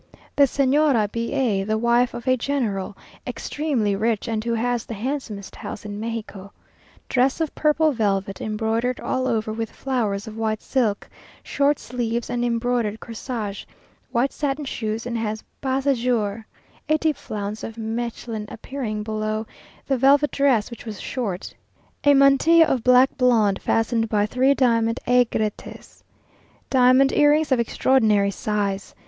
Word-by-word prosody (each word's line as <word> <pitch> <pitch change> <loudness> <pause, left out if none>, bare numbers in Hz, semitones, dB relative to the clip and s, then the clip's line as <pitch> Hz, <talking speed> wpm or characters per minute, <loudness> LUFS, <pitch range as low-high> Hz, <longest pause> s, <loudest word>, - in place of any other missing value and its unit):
The 285 - +6
Señora 270 -5 +2
B 230 0 -3
a, 215 -7 +1
the 215 +2 -1
wife 235 +2 +2
of 235 +2 -8
a 255 - +4
General, 230 -7 -2 0.3
extremely 260 -10 -1
rich, 220 +2 -1
and 220 -1 -2
who 235 0 -1
has 240 0 -1
the 230 - -7
handsomest 220 -4 -5
house - - -8
in 205 0 -6
Mexico. 215 -3 -6 0.6
Dress 260 +3 +1
of 320 -3 -1
purple 305 +1 +2
velvet, 195 -5 -1
embroidered 225 +3 -1
all 260 0 -1
over 220 -1 -1
with 225 0 -3
flowers 220 -7 -2
of 220 -1 -9
white 220 -1 -2
silk, 230 -7 0 0.4
short 285 0 +1
sleeves, 235 -1 -3
and 240 0 -1
embroidered 235 -2 0
corsage; 225 -3 -5 0.5
white 245 +3 +1
satin 290 0 -2
shoes 220 -3 -3
and 235 -1 -3
has 215 -1 -3 0.2
bas 265 0 -1
à 280 - +4
jour; 225 -3 -1 0.4
a 310 - +4
deep 310 -1 0
flounce 210 0 -6
of 225 - -6
Mechlin 225 -1 -4
appearing 220 -4 -5
below 215 0 -2 0.4
the 270 - 0
velvet 280 +3 +4
dress, 260 -6 +2
which 235 - -9
was 215 -4 -7
short. 205 -8 -4 0.5
A 285 0 +6
mantilla 275 +5 +6
of 260 -7 -1
black 250 +1 +5
blonde, 225 -6 +3
fastened 225 0 0
by 210 -1 +2
three 260 +5 +2
diamond 230 -3 +2
aigrettes. 235 -4 -1 0.7
Diamond 260 +1 +5
earrings 295 0 +3
of 260 - +3
extraordinary 220 -4 +2
size. 200 -1 -3
235 Hz, 150 wpm, -23 LUFS, 215-265 Hz, 0.7 s, The